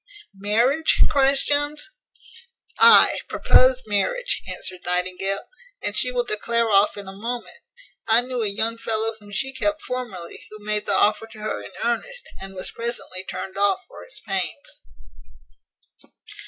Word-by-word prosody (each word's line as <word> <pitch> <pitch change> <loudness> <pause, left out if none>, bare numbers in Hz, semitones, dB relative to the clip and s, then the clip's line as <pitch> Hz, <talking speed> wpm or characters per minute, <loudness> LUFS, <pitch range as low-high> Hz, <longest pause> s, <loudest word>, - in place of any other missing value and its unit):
"Marriage?" 230 +10 +2
cries 275 -1 +3
Jones. 295 +5 -1 0.9
"Ay, 460 0 +8
propose 260 0 +4
marriage," 220 - 0
answered 185 -1 -5
Nightingale, 185 +2 -1 0.4
"and 205 0 -4
she 250 +3 +1
will 245 -1 0
declare 235 0 0
off 200 +1 +4
in 200 -1 -8
a 190 - -8
moment. 235 +5 -6 0.5
I 225 +2 +5
knew 250 -1 -4
a 215 - 0
young 225 +3 -1
fellow 225 0 -1
whom 205 -1 -14
she 265 +6 -2
kept 310 +4 -1
formerly, 240 -9 -6
who 215 - -10
made 210 0 -2
the 200 - +1
offer 210 +1 +2
to 225 -1 -14
her 215 - -3
in - - -9
earnest, 480 - -2
and 195 0 -7
was 185 - -1
presently 230 -5 -4
turned 190 +1 -6
off 205 - +2
for - - -12
his - - -3
pains." 190 - -4
225 Hz, 150 wpm, -23 LUFS, 200-260 Hz, 0.9 s, Ay